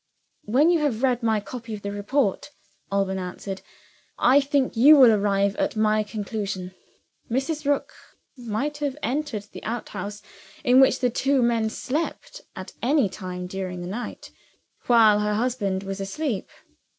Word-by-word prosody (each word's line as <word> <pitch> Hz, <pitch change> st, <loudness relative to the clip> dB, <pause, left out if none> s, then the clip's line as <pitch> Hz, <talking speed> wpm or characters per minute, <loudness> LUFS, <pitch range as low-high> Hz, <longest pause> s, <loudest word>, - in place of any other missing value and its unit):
"When 275 Hz, +10 st, +4 dB
you 340 Hz, -, +3 dB
have 270 Hz, -6 st, -1 dB
read 250 Hz, -2 st, +2 dB
my 220 Hz, -2 st, +2 dB
copy 225 Hz, +2 st, -7 dB
of 205 Hz, -, -11 dB
the 200 Hz, -, -3 dB
report," 205 Hz, +4 st, -1 dB, 0.4 s
Alban 195 Hz, -1 st, 0 dB
answered, 190 Hz, +1 st, -6 dB, 0.6 s
"I 260 Hz, +3 st, +5 dB
think 275 Hz, -2 st, 0 dB
you 275 Hz, +7 st, +8 dB
will 255 Hz, -5 st, +8 dB
arrive 200 Hz, -1 st, +1 dB
at -, -, -1 dB
my 215 Hz, 0 st, +2 dB
conclusion. 200 Hz, -3 st, -4 dB, 0.6 s
Mrs. 280 Hz, +5 st, -2 dB
Rook 285 Hz, -1 st, 0 dB, 0.4 s
might 250 Hz, +4 st, -3 dB
have 290 Hz, -2 st, -2 dB
entered 255 Hz, -4 st, -2 dB
the -, -, -10 dB
outhouse 210 Hz, -3 st, -5 dB, 0.4 s
in 255 Hz, -1 st, +5 dB
which 265 Hz, -1 st, +4 dB
the 250 Hz, -1 st, +2 dB
two 270 Hz, +1 st, +2 dB
men 230 Hz, -2 st, +1 dB
slept, 320 Hz, -, -4 dB
at -, -, -8 dB
any 270 Hz, -4 st, +2 dB
time 180 Hz, -1 st, -6 dB
during 185 Hz, -1 st, -5 dB
the 175 Hz, -, -6 dB
night, 225 Hz, +6 st, -6 dB, 0.6 s
while 220 Hz, -4 st, +6 dB
her 210 Hz, 0 st, 0 dB
husband 210 Hz, -5 st, -1 dB
was 195 Hz, 0 st, -5 dB
asleep. 225 Hz, +2 st, -3 dB
225 Hz, 150 wpm, -24 LUFS, 200-265 Hz, 0.6 s, you